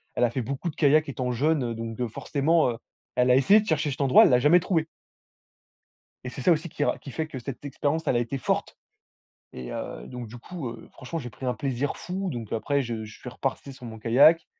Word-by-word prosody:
Elle 125 - +1
a 120 - +4
fait 130 - -2
beaucoup 140 +8 -3
de - - -9
kayaks 150 0 +4
étant 125 -1 -2
jeune, 145 +4 +1
heu, 115 -1 -3
donc 115 0 -5
de 125 0 -2
forcément 150 +5 +1
heu, 115 - -6 0.4
elle 125 0 +3
a - - +6
essayé 195 +11 +6
de 215 - -9
chercher 150 -2 +1
cet 135 - -4
endroit. 135 -2 +7
Elle - - +6
l'a 125 - +5
jamais 155 +7 +6
trouvé 165 -2 0 1.4
et 125 - -4
c'est 130 - -7
ça 175 - +4
aussi 165 +1 +1
qui 145 - -2
ra - - +1
qui 135 - -10
fait 160 +3 -3
que 140 - -7
cette 125 +1 -7
d 145 - -4
expérience, 145 +4 -1
elle - - +2
a 120 - +3
été 120 +3 -2
forte. 125 - -2 0.8
Et, 65 -1 -7
heu, - - -6
donc, 125 -2 -7
du 120 - -10
coup, 150 0 -6
heu, 115 -1 -10
franchement, 140 +5 -6
j'ai 120 -5 -6
pris 130 - -8
un 125 - 0
plaisir 135 0 -2
fou. 190 +2 -4
Donc 115 -5 -6
après, 140 +5 0
je 115 -3 -4
je 105 -1 -12
suis - - -8
reparti 135 +1 -4
sur 125 -2 -11
mon 110 -1 -8
kayak. 140 +9 +5
135 Hz, 250 wpm, -26 LUFS, 120-155 Hz, 1.4 s, endroit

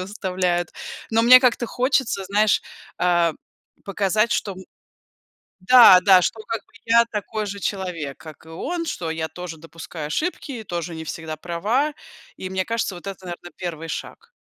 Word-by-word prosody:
выставляют, 185 -3 -2 0.4
но 225 0 +3
мне 255 +2 +9
как-то 250 -1 +2
хочется, 250 -5 0
знаешь, 205 +2 +2 0.4
э, 175 -1 +3 0.5
показать, 205 +3 +1
что, 200 -4 -1
м 190 0 -11 1.0
Да 200 -3 +9
да, 185 -1 +6
что 220 - -2
как 225 -2 -3
бы - - -32
я 235 +1 +5
такой 215 0 -3
же 200 0 -6
человек, 180 -8 -4
как 155 -1 -13
и - - -14
он, 335 - -4
что 175 - -4
я 160 0 -3
тоже 180 -2 -8
допускаю 160 -1 -8
ошибки, 310 - -3
и 225 -2 -6
тоже 170 -3 -5
не 160 - -6
всегда 160 0 -6
права, 210 - -1 0.4
и, 185 - -6
мне 190 0 -2
кажется, 230 -4 -2
вот 175 - -11
это, 190 -1 -7
наверно, 175 0 -8
1 165 -3 -5
шаг. 160 - -7
185 Hz, 165 wpm, -22 LUFS, 170-220 Hz, 1.0 s, мне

